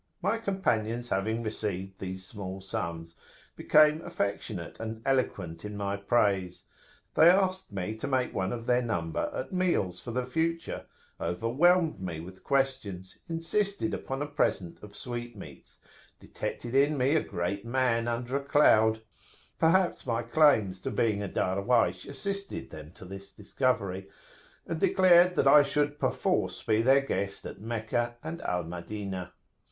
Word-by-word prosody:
My 200 +5 0
companions 120 - -1
having 110 +4 -1
received 95 -3 -4
these 95 0 -6
small 95 -1 -7
sums, 85 -3 -5 0.4
became 155 +1 +5
affectionate 100 - -4
and 110 0 -5
eloquent 100 -11 -1
in 105 0 -6
my 100 -1 -1
praise: 100 -3 +1 0.5
they 160 - +7
asked 185 - +2
me 100 +2 -3
to 125 - -4
make 130 -2 0
one 95 0 -1
of 115 -1 -5
their 125 0 +3
number 85 -9 -2
at - - -5
meals 170 - 0
for - - -9
the 125 +1 -1
future, 165 +5 -2 0.3
overwhelmed 150 - +2
me 85 -4 -4
with 95 +3 -11
questions, 130 -10 -1
insisted 170 +2 -1
upon 135 +2 -3
a - - -2
present 145 - -1
of 105 -1 -12
sweetmeats, 120 +3 -8 0.4
detected 120 0 -6
in 145 +2 +3
me 135 +4 +2
a 160 - +4
great 90 +4 -3
man 120 -1 +1
under 120 +2 -2
a 140 - -5
cloud, 110 -6 +4 0.6
perhaps 170 -2 +2
my 115 -1 0
claims 115 -8 +3
to - - -3
being 105 -3 +1
a 100 - -3
Darwaysh 100 +9 +1
assisted 200 +7 -5
them 75 0 -10
to 95 - -12
this 95 +1 -9
discovery, 100 -4 -1 0.6
and 165 - -3
declared 180 -1 +5
that 140 - +3
I 145 +2 +9
should 145 +1 0
perforce - - 0
be 110 0 +2
their 135 +3 +5
guest 100 -7 -3
at - - -8
Meccah 115 +1 -2
and 165 +2 -5
Al 90 -1 -1
Madinah. 90 +2 -6
115 Hz, 145 wpm, -29 LUFS, 95-145 Hz, 0.6 s, I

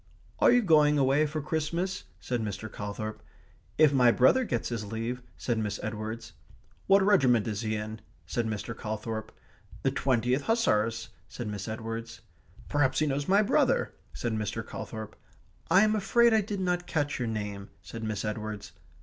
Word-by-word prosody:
"Are - - +6
you 245 -1 +5
going 150 -5 +5
away 140 +2 +3
for 150 0 -4
Christmas?" 170 +5 -2
said 125 -2 -2
Mr. 105 0 -4
Calthorp. 105 +1 -5 0.6
"If 155 -2 +6
my 125 -3 +6
brother 130 - +4
gets 120 - -2
his 115 -3 -3
leave," 115 +4 -4 0.2
said 120 -3 -1
Miss 105 -2 -2
Edwards. 110 +1 -5 0.5
"What 195 0 +6
regiment 130 - +4
is 105 -1 -2
he 110 -1 -1
in?" 110 +1 -5 0.2
said 120 -2 -1
Mr. 110 +1 -4
Calthorp. 110 0 -4 0.5
"The - - +2
Twentieth 125 +1 +1
Hussars," 115 - +1 0.2
said 120 - -6
Miss 100 -2 -5
Edwards. 115 +1 -5 0.5
"Perhaps 145 -3 +2
he 155 - +3
knows 140 0 -1
my 200 +3 +5
brother?" - - +2 0.2
said 120 -2 -3
Mr. 105 -2 -3
Calthorp. 110 -1 -7 0.5
"I 185 +4 +6
am 215 0 +3
afraid 235 +3 +4
I 220 - +5
did 200 -1 -4
not 180 -1 0
catch 145 -3 -1
your 120 - -1
name," 105 -2 -4
said 115 -1 -7
Miss 110 -1 -2
Edwards. 105 -1 -4
120 Hz, 165 wpm, -29 LUFS, 110-155 Hz, 0.6 s, Are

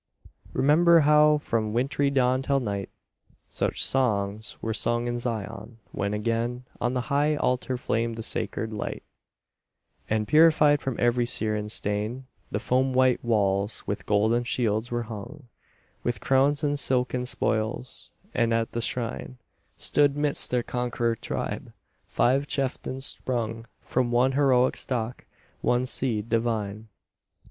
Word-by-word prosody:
Remember 165 +4 +5
how 150 0 +5
from 110 -6 -1
wintry 135 +4 +1
dawn 130 -1 +2
till 140 +1 +1
night, 100 -6 -3 0.6
Such - - 0
songs 110 -3 0
were 115 - -2
sung 120 +2 0
in 120 0 -2
Zion, 115 -1 -5
when 100 +1 -2
again 115 +3 -2 0.2
On 120 +2 0
the 125 - +1
high 150 +2 +3
altar 125 -2 0
flamed 115 -1 -1
the 115 - -5
sacred 110 0 -2
light, 105 - -4 1.1
And, 110 -1 0
purified 150 0 +5
from 135 -3 -2
every 120 0 +2
Syrian 105 -2 -1
stain, 105 +5 -3 0.2
The - - -2
foam 130 +3 +1
white 130 -1 +3
walls 100 -2 +1
with 100 - -4
golden 110 +3 +2
shields 120 -3 0
were 120 0 -1
hung, 115 +5 -9 0.5
With 120 -3 -1
crowns 140 +5 +2
and 145 -1 +1
silken 125 -1 0
spoils, 115 +2 -2 0.2
and 115 -1 +2
at 115 0 -1
the 120 - -2
shrine, 125 +2 -3 0.4
Stood, 145 -1 +3
midst 145 -1 0
their 125 -1 0
conqueror 120 -1 -1
tribe, - - -5 0.3
five 135 +4 +2
chieftains 135 -1 -2
sprung 115 -4 -3
From 125 -1 0
one 120 +2 +3
heroic 130 -2 +3
stock, 120 -2 -3 0.4
one 125 +1 +2
seed 115 -4 -2
divine. 110 -2 -1
120 Hz, 135 wpm, -26 LUFS, 110-130 Hz, 1.1 s, Remember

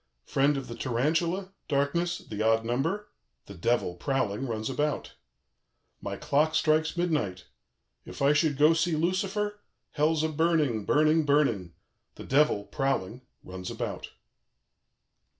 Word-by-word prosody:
"Friend 140 +1 +2
of 135 - -5
the 115 - -6
tarantula, 165 +11 -1
darkness, 170 +5 0
the 105 -1 -7
odd 115 +1 +2
number, 190 - -2 0.3
the 100 - -10
Devil, 100 0 0
prowling, 130 +2 -1
runs 110 -2 -3
about. 145 +3 -2 0.4
" - - -48
My - - -4
clock 155 +3 +1
strikes 160 +2 +2
midnight. 150 - -1 0.6
If - - -10
I 140 +1 +4
should 150 -2 +2
go 150 +2 +6
to 165 - +3
see 165 0 +1
Lucifer? 195 +5 -1 0.3
Hell's 155 +1 +1
a 160 - +1
burning, 155 -8 +1
burning, 155 +2 +3
burning; 135 - +1 0.4
the - - -9
Devil, 135 -7 +3
prowling, 125 -2 -2 0.2
runs 90 0 -7
about." - - -5
145 Hz, 135 wpm, -28 LUFS, 115-160 Hz, 0.6 s, go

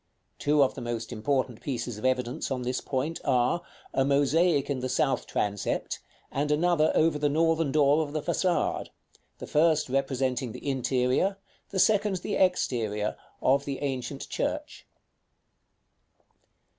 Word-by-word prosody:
Two 145 0 +4
of 130 - +1
the - - -7
most 120 -2 -4
important 130 0 -1
pieces 120 -5 -4
of 110 - -6
evidence 125 -1 0
on 130 -2 -2
this 125 +1 -2
point 145 +5 -2
are, 130 +5 +2 0.3
a 135 - +3
mosaic 145 +3 +3
in 140 -3 -1
the 130 +1 -3
south 130 +1 0
transept, 100 -1 -2 0.3
and 145 +2 -1
another 155 +1 +3
over 155 -2 +3
the 145 0 +2
northern 165 0 +2
door 145 +1 +4
of 150 -2 -3
the 155 -1 -3
façade; 180 -2 0 0.5
the - - -7
first 155 -2 +2
representing 130 -2 -1
the 125 - -8
interior, 130 +7 +1 0.3
the 195 - -4
second 210 0 +3
the - - -3
exterior, 115 - +1 0.3
of 140 +2 +3
the 140 -1 -3
ancient 135 0 -3
church. - - -3
140 Hz, 145 wpm, -28 LUFS, 125-155 Hz, 0.5 s, Two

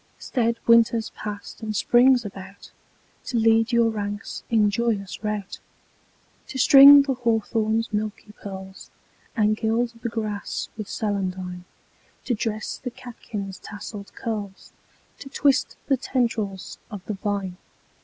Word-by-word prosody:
Staid 235 -2 -1
Winter's 230 -1 +4
passed 210 +1 -8
and 215 -1 -4
Spring's 245 +2 +4
about 195 0 -10 0.5
To 245 - -2
lead 225 +1 +3
your 235 -1 +3
ranks 205 -1 -5
in 215 -3 +3
joyous 210 -3 -2
rout; 210 -2 -3 0.9
To 265 - -6
string 280 +2 +9
the 275 -1 -1
hawthorn's 225 -2 0
milky 210 0 -3
pearls, 190 -2 -10 0.5
And 215 -1 +3
gild 230 +2 0
the 235 - -2
grass 215 -3 -4
with 215 -2 -6
celandine; 185 -3 -3 0.6
To 250 - 0
dress 215 -1 -3
the 250 - -5
catkins' 210 -6 -8
tasselled 205 -1 -9
curls, 205 -4 -5 0.5
To 275 - -9
twist 275 -1 +1
the 270 - +2
tendrils 230 -7 -2
of 205 -4 -8
the 215 - -3
vine. 195 -2 -3
215 Hz, 125 wpm, -24 LUFS, 205-235 Hz, 0.9 s, string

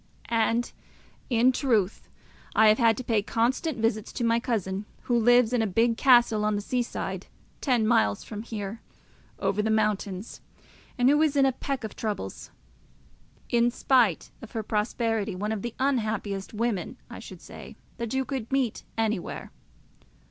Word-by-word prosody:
And, 230 +1 +1 0.6
in 245 +1 +4
truth, 225 -8 0 0.5
I 220 -1 +7
have 215 - +4
had 230 -2 +4
to 255 - -4
pay 225 -3 +1
constant 250 +8 0
visits 225 -1 -1
to 245 - -3
my 230 0 +3
cousin, 205 -4 -2 0.2
who 245 - 0
lives 245 0 +4
in 245 - +3
a 220 - +1
big 230 +4 +2
castle 240 -4 +5
on 210 0 +1
the 205 - -1
sea 250 +3 0
side, 240 - -4 0.3
ten 245 -5 +2
miles 160 - +2
from 210 -1 -7
here, 220 -1 -6 0.6
over 210 - 0
the 220 - -1
mountains, 210 -2 -1 0.6
and 245 0 +3
who 295 +3 +5
is 305 -2 +2
in 275 -1 +5
a 265 - +4
peck 265 0 -4
of 220 - -6
troubles; 205 - -4 1.0
in 235 0 +3
spite 245 - +2
of 230 - -11
her 225 -2 -2
prosperity 215 -1 -1
one 210 +3 -2
of 220 -2 -2
the 235 +1 -5
unhappiest 215 -7 -1
women, 220 -3 -2
I - - -9
should - - -10
say, - - -11 0.2
that 235 -2 -4
you 265 0 +1
could 260 -4 -4
meet 265 -5 0
anywhere. 220 -5 -2
225 Hz, 165 wpm, -27 LUFS, 210-245 Hz, 1.0 s, I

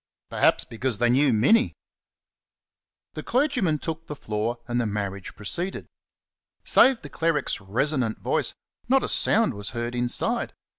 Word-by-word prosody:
Perhaps - - +3
because 120 0 -2
they 120 +2 +3
knew 135 +2 +4
Minnie. 215 - +3 1.4
The - - -5
clergyman 250 - +1
took 160 +1 -6
the 150 - -5
floor, 110 -1 -3
and 120 0 0
the 115 - -1
marriage 100 -2 -4
proceeded. 175 - -4 0.8
Save 260 -3 +5
the - - -7
cleric's 155 -6 -1
resonant 125 +3 -1
voice, - - -1 0.3
not 270 +1 +4
a - - -1
sound 225 - +2
was 100 -1 -6
heard 120 +1 -3
inside. 120 0 0
125 Hz, 140 wpm, -25 LUFS, 110-165 Hz, 1.4 s, Save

